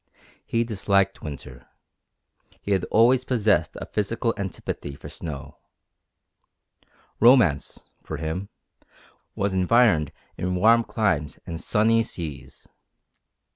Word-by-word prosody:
He 115 0 0
disliked 100 -3 0
winter; 65 -5 -9 0.9
he 100 - -5
had 95 -2 +1
always 120 +3 +4
possessed 105 -11 +1
a - - -6
physical 115 +3 -1
antipathy 95 -7 -5
for - - -10
snow; 70 -5 -8 1.6
romance, 115 - +3
for 80 - -6
him, 80 +6 -4 0.9
was 100 -1 -1
environed 95 - +3 0.3
in 90 0 -1
warm 115 +5 +5
climes 85 -10 -1
and 85 -1 -5
sunny 115 +1 +3
seas. 80 -10 -6
100 Hz, 100 wpm, -24 LUFS, 80-115 Hz, 1.6 s, warm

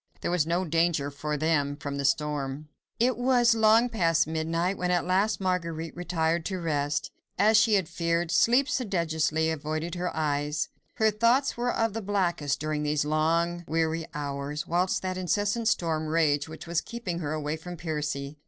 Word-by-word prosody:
There - - -1
was 170 -3 +1
no 175 +3 0
danger 165 -3 +1
for 150 +2 -3
them 145 -2 +1
from 140 -1 -5
the 140 - -2
storm. 145 0 -1 0.3
It 245 0 +2
was 245 -2 +4
long 225 +2 +5
past 170 -8 +2
midnight 165 +4 -1
when 180 -1 -2
at 175 -1 +1
last 195 +4 +1
Marguerite 170 -4 -2
retired 170 -1 0
to 190 - -2
rest. 145 -3 -1 0.3
As 215 +2 +4
she 220 0 +5
had 190 -5 +1
feared, 170 0 -1
sleep 250 +4 +4
sedulously 160 - 0
avoided 155 +2 -3
her 180 0 -2
eyes. 150 0 -1 0.3
Her 220 -2 +3
thoughts 235 +6 +2
were 245 +1 0
of 225 -2 0
the 225 - -3
blackest 180 -8 0
during 155 0 -2
these 150 0 0
long, 165 +3 +1
weary 160 0 0
hours, 145 +1 -4
whilst 180 +3 0
that 185 0 -2
incessant 205 +5 0
storm 160 -7 0
raged 155 -2 +2
which 160 +1 -9
was 170 -1 0
keeping 205 -8 -5
her 155 -2 -3
away 150 0 -2
from 175 +2 -8
Percy. 150 -3 -4
165 Hz, 170 wpm, -27 LUFS, 150-190 Hz, 0.3 s, long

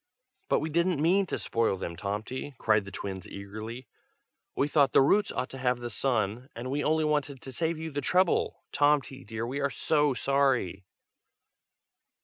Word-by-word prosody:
"But - - +3
we 155 - -3
didn't 170 0 +2
mean 185 +5 +3
to - - -2
spoil 115 -4 0
them, 85 -2 -5
Tomty!" 105 - -4
cried 110 -2 +2
the 100 - -9
twins 95 -2 -5
eagerly. 110 +5 -7 0.7
"We 140 - +2
thought 145 -3 +3
the - - +7
roots 205 +9 +3
ought 125 - -3
to 135 - -8
have 125 -1 +1
the 120 0 -5
sun, 120 +1 -1
and 125 +3 -5
we 145 +1 0
only 155 +1 +2
wanted 145 -2 0
to 130 - -9
save 160 +3 -1
you 160 0 -5
the 145 0 -2
trouble, 180 -1 +2
Tomty 145 -2 +2
dear! 110 0 -5
and 120 - -3
we 140 +2 -2
are 140 - +2
so 145 -1 +1
sorry!" 125 -9 +1
135 Hz, 180 wpm, -29 LUFS, 115-150 Hz, 0.7 s, the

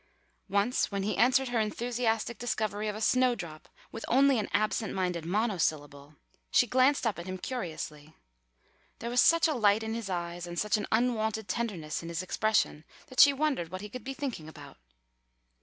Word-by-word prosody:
Once 205 +6 +1
when 200 -1 -2
he 210 - -1
answered 260 +1 +3
her 240 -2 0
enthusiastic 230 +1 -1
discovery 215 -3 -2
of 210 - -2
a 215 - -6
snowdrop 220 -11 0 0.2
with 225 - -7
only 270 0 +4
an 210 - -3
absent 215 +1 0
minded 180 -3 -1
monosyllable, 155 -8 -1 0.3
she - - +4
glanced 255 +3 +3
up 215 -6 0
at 170 - -7
him 185 0 -4
curiously. 160 - -6 0.8
There 235 - -5
was 245 - +4
such 335 0 +5
a 315 - 0
light 215 -3 +3
in 220 0 -3
his 230 -3 -4
eyes 175 -1 -4
and 175 0 -7
such 210 +3 +1
an 210 - -2
unwonted 220 -2 0
tenderness 185 -7 -3
in 165 - -7
his 170 +1 -3
expression 215 -5 0 0.3
that 255 - -6
she 285 - +9
wondered 275 - -1
what 185 +2 -6
he 210 - -7
could 250 +4 -8
be 270 +1 -5
thinking 240 - -5
about. - - -12
215 Hz, 180 wpm, -29 LUFS, 180-245 Hz, 0.8 s, she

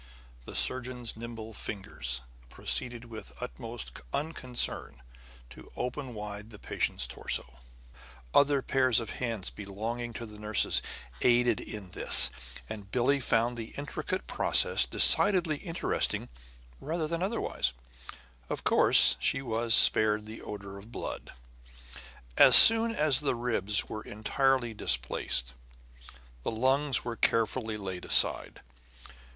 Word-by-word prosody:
The - - -10
surgeon's 125 -2 -2
nimble 115 -1 -9
fingers 60 - -3 0.3
proceeded 120 - -1
with 115 -2 -10
the - - -11
utmost 120 -1 -7
unconcern 130 - -3 0.5
to - - -14
open 125 -1 -5
wide 105 0 -8
the 105 - -11
patient's - - -1
torso. 60 +1 -5 0.7
Other 140 -1 +3
pairs 130 -3 +2
of 115 - -6
hands, 115 -6 -4
belonging 115 +4 -6
to 115 - -7
nurses, 105 -1 +1 0.4
aided 120 -2 +2
in 100 -4 -9
this; - - +4 0.4
and 105 -2 -9
Billie 130 +5 +1
found 120 -1 0
the 115 -1 -8
intricate 155 +5 -5
process - - +2
decidedly 180 -7 +3
interesting 165 +1 -1 0.5
rather 160 +1 -3
than 170 +2 -4
otherwise. 200 - -2 0.8
Of - - -5
course - - +6
she 135 - 0
was 115 -1 +1
spared 105 -1 +4
the 110 +1 -10
odor 100 -1 -9
of 110 +4 -15
blood. - - -7 1.1
As - - +7
soon 225 0 +9
as 150 -4 +2
the 145 -4 -1
ribs 110 -4 0
were 110 - -7
entirely 120 +3 -1
displaced, - - -1 0.9
the - - -3
lungs 130 +4 +1
were 120 -1 -4
carefully 110 0 0
laid 95 -3 -7
aside. - - +2
115 Hz, 120 wpm, -29 LUFS, 105-130 Hz, 1.1 s, soon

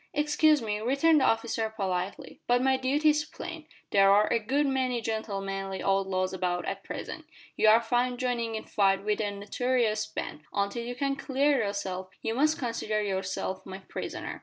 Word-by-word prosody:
"Excuse 300 -1 +3
me," 210 -1 -2
returned 280 +7 +3
the - - +4
officer 225 0 +1
politely, 190 -3 -4
"but 245 0 +4
my 265 0 +4
duty 275 +4 +2
is 300 0 0
plain. 315 +1 -8 0.2
There 195 -1 +5
are 205 +2 +6
a - - +3
good 270 +7 +1
many 260 -3 0
gentlemanly 195 -4 -3
outlaws 190 -1 +1
about 175 -2 -1
at 195 +2 -4
present. - - -6 0.3
You - - +3
are 220 +1 +8
found 245 +1 +1
joining 240 -3 -1
in 220 - -4
fight 195 -2 +2
with 210 0 +1
a 205 - 0
notorious 215 +2 0
band. 160 -1 -6
Until 200 +4 -1
you 245 +1 -5
can 275 +2 0
clear 275 +1 +2
yourself 190 -2 -3
you 225 - -1
must 305 +5 +2
consider 230 -3 -2
yourself 190 -1 -3
my 190 0 -7
prisoner. 190 - -6
220 Hz, 175 wpm, -28 LUFS, 195-260 Hz, 0.3 s, are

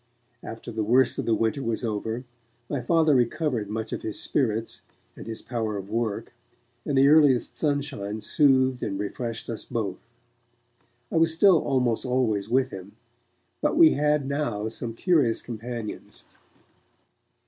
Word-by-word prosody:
After 115 +1 -8
the 110 -1 -2
worst 120 +3 +3
of - - -3
the 115 - +3
winter 115 +5 0
was 115 -1 -2
over, 110 +2 -3 0.4
my 140 -1 -2
Father 160 +3 +3
recovered 125 -3 0
much 110 +1 -4
of - - -4
his 110 - -5
spirits 115 -5 -1 0.3
and - - -10
his 110 -1 -6
power 110 -4 -3
of 100 +1 -8
work, 115 0 -2 0.5
and 140 - 0
the 135 +1 +6
earliest 145 -4 +4
sunshine 140 -9 -2
soothed 130 0 +3
and 100 - -3
refreshed 115 +3 -4
us 115 - -5
both. 100 -5 -3 1.1
I - - 0
was 165 0 +3
still 180 -2 +5
almost 125 -4 0
always 120 -5 0
with 130 +1 +2
him, 95 +1 -9 0.7
but 300 0 +1
we 325 -1 +8
had 150 -1 +1
now 120 -7 -2
some 115 0 -6
curious 145 -8 +2
companions. 115 -1 -7
120 Hz, 150 wpm, -26 LUFS, 110-140 Hz, 1.1 s, we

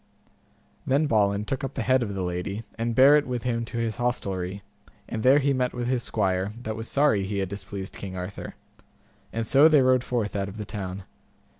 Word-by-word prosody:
Then 140 +4 +3
Balin 105 -5 +2
took 135 +4 -3
up 135 - -4
the - - -1
head 130 0 +3
of 100 -4 -3
the 95 - -2
lady, 90 +4 -3
and 115 0 -2
bare 140 +4 +8
it 150 - 0
with 125 -2 -3
him 115 -2 -1
to 115 - -6
his 115 -2 -1
hostelry, 100 -6 -2 0.4
and 110 - -4
there 130 +4 +6
he 140 -1 +2
met 125 -1 -1
with 120 -1 -2
his 125 0 0
squire, 95 -1 -1
that 110 0 -3
was 115 +1 -6
sorry 140 -9 +2
he 100 +1 -3
had 95 -2 -1
displeased 100 0 -6
King 95 -2 -7
Arthur 90 +2 -6 0.8
and 115 0 -2
so 140 +6 +6
they 150 -4 +5
rode 130 -1 +3
forth 115 -6 -2
out 100 -1 -1
of 100 - -10
the 105 - -5
town. 95 -1 -6
110 Hz, 210 wpm, -26 LUFS, 100-130 Hz, 0.8 s, bare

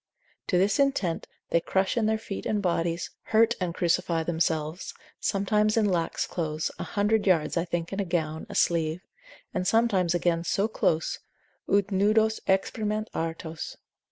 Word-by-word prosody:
To 180 - +2
this 195 +7 +2
intent 270 -12 +1 0.2
they 170 - +3
crush 190 +3 0
in 225 -3 +2
their 220 0 +2
feet 215 -3 -6
and 210 - +1
bodies, 170 -2 -1
hurt 225 +1 +4
and 180 -2 0
crucify 170 -1 +1
themselves, 160 0 -1 0.2
sometimes 210 +2 +1
in 220 - +4
lax 175 -4 0
clothes, 155 -2 -2
a - - -2
hundred 205 +1 +1
yards 170 -5 +3
I 170 0 +1
think 170 +1 -3
in 195 - -3
a - - +2
gown, 160 -3 -2
a - - -7
sleeve; 165 +1 +1 0.5
and 185 -2 -1
sometimes 195 -7 +3
again 170 -1 +1
so 195 +5 +1
close, 165 -7 0 0.5
ut 200 0 +3
nudos 215 +3 +3
exprimant 215 +2 0
artus. 165 0 -4
185 Hz, 155 wpm, -27 LUFS, 165-210 Hz, 0.5 s, hurt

